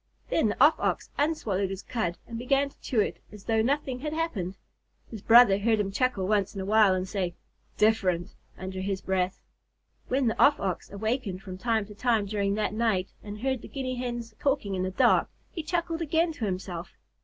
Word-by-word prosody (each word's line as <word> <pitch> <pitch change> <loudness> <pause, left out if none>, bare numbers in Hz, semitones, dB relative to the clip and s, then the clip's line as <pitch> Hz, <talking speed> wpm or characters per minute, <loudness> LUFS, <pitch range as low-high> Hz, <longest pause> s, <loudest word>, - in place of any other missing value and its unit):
Then 320 - +3
the - - -4
Off 300 +2 +6
Ox - - -1
unswallowed 220 -11 0
his 195 0 -6
cud 180 -8 -2
and 230 - -8
began 275 +3 +2
to - - -27
chew 240 - -1
it - - -2
as 210 -2 -12
though 225 -1 +2
nothing 265 +1 0
had 300 +3 -4
happened. 215 - -2 0.5
His 220 -4 -7
brother 230 -3 +7
heard 220 +1 +2
him 195 -1 -1
chuckle 205 -4 0
once 205 -1 +1
in 195 - -3
a - - -4
while, 210 -2 +5
and 185 0 -2
say, 185 -3 -2 0.4
"Different!" 190 -5 +2 0.2
under 190 0 -5
his 195 0 -2
breath. 190 -1 -1 0.6
When 265 +1 +1
the 225 - 0
Off 290 - +5
Ox 190 -3 -3
awakened 205 -2 -3
from 185 -2 -8
time 225 -2 +1
to 210 - -11
time 225 -1 +1
during 200 -1 0
that 215 0 -1
night 215 -5 +1
and 210 0 -8
heard 265 -2 -1
the - - -9
Guinea 255 -2 -4
Hens 240 -2 -4
talking 270 -8 0
in 185 - -1
the 185 - -1
dark, 190 - +3 0.2
he 335 - -4
chuckled 335 +1 -2
again 330 +2 +1
to 250 -8 -4
himself. 180 -3 -4
215 Hz, 200 wpm, -28 LUFS, 195-255 Hz, 0.6 s, brother